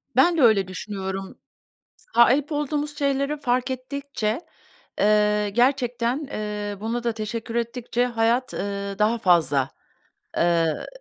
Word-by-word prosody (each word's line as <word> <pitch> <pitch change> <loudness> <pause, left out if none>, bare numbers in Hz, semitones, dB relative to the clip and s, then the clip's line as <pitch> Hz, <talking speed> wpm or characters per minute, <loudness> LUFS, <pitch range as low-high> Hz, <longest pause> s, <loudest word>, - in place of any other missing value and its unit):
Ben 335 +7 +5
de - - +3
öyle 215 -6 +5
düşünüyorum. 190 0 -5 0.8
Sahip 260 +6 +5
olduğumuz 295 0 -2
şeyleri 280 +1 0
fark 250 0 0
ettikçe, 260 -2 -3 0.6
eee, 210 0 +3
gerçekten, 245 +3 +1
eee, 210 -2 -4
buna 230 +3 -3
da 235 - +1
teşekkür 225 +1 -5
ettikçe 235 +1 -1
hayat, 235 +1 +1
eee, 200 0 -3
daha 215 +3 +3
fazla, 165 - +3 0.7
eee, 165 -2 +1
235 Hz, 115 wpm, -24 LUFS, 205-260 Hz, 0.8 s, Ben